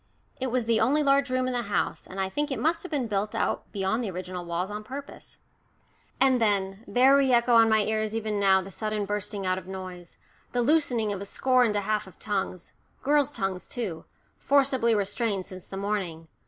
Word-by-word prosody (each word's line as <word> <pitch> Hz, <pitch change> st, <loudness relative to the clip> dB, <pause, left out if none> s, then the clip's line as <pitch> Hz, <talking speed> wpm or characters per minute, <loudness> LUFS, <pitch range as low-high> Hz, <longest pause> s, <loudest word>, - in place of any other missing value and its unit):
It 260 Hz, -, -1 dB
was 250 Hz, -1 st, 0 dB
the 225 Hz, -1 st, +2 dB
only 295 Hz, +3 st, +3 dB
large 275 Hz, -1 st, +3 dB
room 255 Hz, 0 st, +1 dB
in 255 Hz, -, -1 dB
the 245 Hz, -, 0 dB
house, 200 Hz, -5 st, -2 dB
and 190 Hz, -, -8 dB
I 190 Hz, -, +1 dB
think 295 Hz, +10 st, -2 dB
it 270 Hz, -, -2 dB
must 330 Hz, +2 st, +1 dB
have 365 Hz, -, -8 dB
been 280 Hz, -5 st, 0 dB
built 210 Hz, -1 st, -2 dB
out -, -, -1 dB
beyond 200 Hz, +4 st, -1 dB
the 215 Hz, -, -2 dB
original 180 Hz, 0 st, -5 dB
walls 175 Hz, +3 st, -2 dB
on 210 Hz, +1 st, -5 dB
purpose. 275 Hz, +5 st, -9 dB, 0.8 s
And 260 Hz, -2 st, +4 dB
then 200 Hz, -1 st, 0 dB
there 260 Hz, +3 st, +5 dB
re 275 Hz, -2 st, +3 dB
echo 240 Hz, 0 st, +4 dB
on 225 Hz, -1 st, +7 dB
my 220 Hz, 0 st, +4 dB
ears 215 Hz, +1 st, -1 dB
even 215 Hz, -2 st, -1 dB
now 190 Hz, -1 st, +4 dB
the 195 Hz, -, -10 dB
sudden 215 Hz, +1 st, -2 dB
bursting 205 Hz, 0 st, -4 dB
out 185 Hz, 0 st, +1 dB
of 185 Hz, -, -15 dB
noise, 185 Hz, -2 st, -8 dB, 0.4 s
the 245 Hz, -1 st, +1 dB
loosening 245 Hz, -7 st, +2 dB
of 195 Hz, -, -5 dB
a -, -, -4 dB
score 255 Hz, +4 st, +2 dB
and 215 Hz, -3 st, +1 dB
a 205 Hz, -, +1 dB
half 210 Hz, 0 st, -1 dB
of 190 Hz, -, -15 dB
tongues, 195 Hz, -4 st, -3 dB, 0.3 s
girls' 290 Hz, 0 st, +3 dB
tongues 195 Hz, -8 st, -3 dB
too, 190 Hz, -10 st, -4 dB, 0.3 s
forcibly 260 Hz, -5 st, +3 dB
restrained 205 Hz, -1 st, -1 dB
since 185 Hz, -2 st, -10 dB
the 195 Hz, -, -7 dB
morning. 190 Hz, -5 st, -3 dB
215 Hz, 210 wpm, -27 LUFS, 195-255 Hz, 0.8 s, on